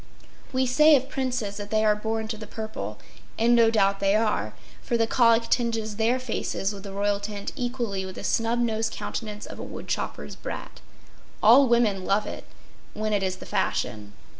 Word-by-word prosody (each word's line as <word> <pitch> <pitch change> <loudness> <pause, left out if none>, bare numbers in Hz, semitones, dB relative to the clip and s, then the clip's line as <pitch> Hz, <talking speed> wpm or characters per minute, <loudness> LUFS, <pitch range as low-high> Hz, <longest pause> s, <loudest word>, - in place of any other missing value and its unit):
We 260 0 +1
say 300 +5 +6
of 265 0 0
princes 250 -6 -2
that 205 0 -6
they 215 0 +2
are 210 -1 +4
born 220 +1 -2
to 220 - -2
the 215 0 -9
purple; 220 0 -6 0.4
and 235 +2 +4
no 230 -1 +6
doubt 200 -3 +2
they 195 +1 +2
are, 210 - 0 0.3
for 235 - 0
the 225 - +3
colic 230 0 +4
tinges 225 -3 0
their 230 +3 +2
faces 220 -5 -2
with 200 - -8
the 200 0 -8
royal 200 +1 0
tint 205 0 -5
equally 240 -7 -2
with 190 0 -7
the - - -7
snub 230 +1 +1
nosed 225 -2 0
countenance 210 -2 -5
of - - -9
a - - -5
woodchopper’s - - -5
brat. - - -7 0.6
All 255 +6 +8
women 230 -5 +2
love 200 +3 +1
it—when 215 0 -7
it 205 - +2
is 190 -1 -1
the - - -11
fashion. 105 -1 -2
220 Hz, 185 wpm, -26 LUFS, 205-235 Hz, 0.6 s, All